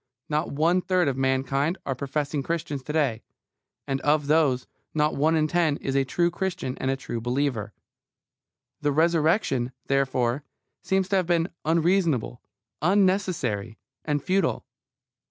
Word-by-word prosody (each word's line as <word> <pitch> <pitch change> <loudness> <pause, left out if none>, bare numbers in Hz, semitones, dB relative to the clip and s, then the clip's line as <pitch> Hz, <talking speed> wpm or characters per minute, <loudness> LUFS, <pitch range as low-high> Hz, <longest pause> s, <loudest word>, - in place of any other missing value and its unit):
Not 150 +2 -1
one 165 +5 +2
third 180 -3 +1
of 135 - 0
mankind 135 +5 0
are 135 - -1
professing 140 +2 -2
Christians 150 -2 -3
to 150 - -4
day, 135 -8 +1 0.6
and 135 0 -2
of 150 0 +2
those 145 -4 +2 0.3
not 150 0 +2
one 155 +3 +2
in 155 -1 +2
ten 160 -3 +1
is 135 - -3
a 135 - +4
true 170 +6 +1
Christian 175 -8 -3
and 130 - -1
a 135 - +1
true 120 -3 -5
believer. 120 -3 -1 1.1
The 145 -1 +1
Resurrection, 155 - +2
therefore, 135 -1 +1 0.4
seems 190 -1 +1
to 195 - +3
have 185 -3 0
been 170 0 +2 0.2
unreasonable, 165 - +1 0.4
unnecessary, 175 - +1 0.3
and 145 -2 -1
futile. 185 -2 0
150 Hz, 140 wpm, -26 LUFS, 135-170 Hz, 1.1 s, a